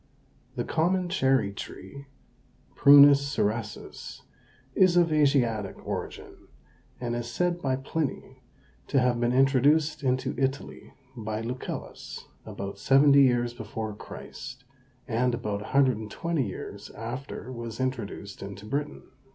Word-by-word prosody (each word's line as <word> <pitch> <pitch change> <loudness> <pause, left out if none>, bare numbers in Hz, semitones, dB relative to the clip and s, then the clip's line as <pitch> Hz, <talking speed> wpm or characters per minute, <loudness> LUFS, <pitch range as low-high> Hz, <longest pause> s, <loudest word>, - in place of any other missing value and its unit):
The - - -1
common 180 +2 0
cherry 130 - +2
tree 140 +7 -9 0.7
(Prunus 140 0 +8
cerasus) 110 -4 -3 0.5
is 180 +1 +4
of 170 -2 +4
Asiatic 125 -9 +2
origin, - - -6 0.5
and 120 -1 -2
is 120 0 -4
said 175 +8 -1
by 130 -2 0
Pliny 140 +3 -4 0.5
to 135 - +2
have 125 -1 +2
been 120 0 +1
introduced 140 +4 +3
into 130 -1 0
Italy 135 +1 -3 0.2
by 110 -2 -4
Lucullus 125 +3 -6 0.2
about 100 0 -6
seventy 140 +1 +6
years 120 -2 +3
before 110 -1 -5
Christ, 130 +5 -9 0.4
and 120 +1 +1
about 105 -4 -3
120 130 +4 0
years 95 - -8
after 125 +2 -7
was 115 -2 -7
introduced 115 -6 -4
into 100 +1 -8
Britain. 145 +6 -3
130 Hz, 115 wpm, -27 LUFS, 115-140 Hz, 0.7 s, Prunus